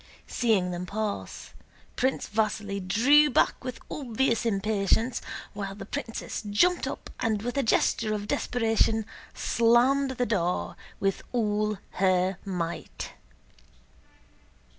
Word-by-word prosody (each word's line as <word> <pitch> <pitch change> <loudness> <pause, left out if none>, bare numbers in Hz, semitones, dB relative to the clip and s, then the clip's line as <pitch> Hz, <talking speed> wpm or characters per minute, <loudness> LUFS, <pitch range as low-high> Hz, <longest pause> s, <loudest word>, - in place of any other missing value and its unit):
Seeing 205 -7 +1
them 180 +1 -4
pass, 210 +1 -4 0.4
Prince 260 +1 0
Vasíli 210 -2 -1
drew 285 +9 +6
back 255 - +2
with 255 -2 -5
obvious 240 -3 0
impatience, 215 +3 +1 0.3
while 195 -2 -5
the 200 -1 -8
princess 225 0 -4
jumped 225 - +2
up - - -6
and 220 -3 0
with 245 +2 -3
a 280 - +2
gesture 220 -2 +2
of 205 0 -5
desperation 225 -2 +1 0.3
slammed 245 +4 +3
the 245 - +1
door 180 -5 -1 0.2
with 195 -1 0
all 210 -3 0 0.2
her 185 0 +2
might. 175 -4 -4
220 Hz, 115 wpm, -27 LUFS, 200-240 Hz, 0.4 s, drew